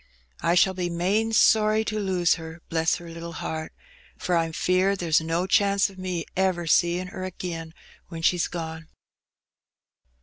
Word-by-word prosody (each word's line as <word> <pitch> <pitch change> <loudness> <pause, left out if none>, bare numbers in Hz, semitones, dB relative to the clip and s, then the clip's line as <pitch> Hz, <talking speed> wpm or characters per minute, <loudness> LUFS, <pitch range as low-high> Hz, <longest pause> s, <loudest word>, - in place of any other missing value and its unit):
I 170 - +2
shall 190 +2 +4
be 180 -1 -2
main 195 +6 0
sorry 215 0 +4
to 215 0 -2
lose 185 -4 +2
her, 160 0 -8
bless 165 0 +1
her 175 -1 -9
little 170 0 -8
heart, 160 -1 -5 0.5
for 180 - -1
I'm 165 -1 +1
feared 185 +4 +1
there's 165 -3 +2
no 165 +3 -1
chance 200 +1 +2
of 190 - -15
me 180 -3 -3
ever 185 -2 +1
seein' 175 +3 +2
her 185 -1 -7
agin 170 -3 -5 0.4
when 165 -2 -8
she's 175 0 +2
gone. 160 -1 -6
175 Hz, 160 wpm, -25 LUFS, 165-190 Hz, 0.5 s, shall